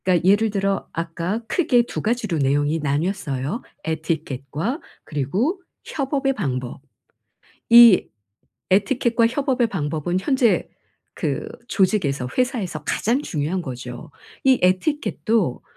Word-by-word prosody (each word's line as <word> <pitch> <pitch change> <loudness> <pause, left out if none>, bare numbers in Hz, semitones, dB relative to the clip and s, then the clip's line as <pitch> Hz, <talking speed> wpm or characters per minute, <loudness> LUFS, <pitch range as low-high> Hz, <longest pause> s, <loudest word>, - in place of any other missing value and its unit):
그러니까 180 -1 +2
예를 210 +3 +4
들어 195 -1 -1
아까 170 +6 -3
크게 250 -5 +3
2 - - -5
가지로 215 -6 -1
내용이 145 +3 +1
나뉘었어요. 150 - -2 0.2
에티켓과 160 - -3 0.2
그리고 195 - -1 0.2
협업의 270 -1 -1
방법. 130 - -4 0.9
이 235 -4 +8 0.6
에티켓과 230 +4 +3
협업의 255 0 +1
방법은 160 -1 -2
현재 250 +1 +2 0.5
그 - - -2 0.2
조직에서 160 - +1
회사에서 230 - -1
가장 240 - 0
중요한 160 - -2
거죠. 125 -3 -7 0.3
이 260 -2 +4
에티켓도 195 - +1
190 Hz, 265 characters per minute, -22 LUFS, 150-235 Hz, 0.9 s, 이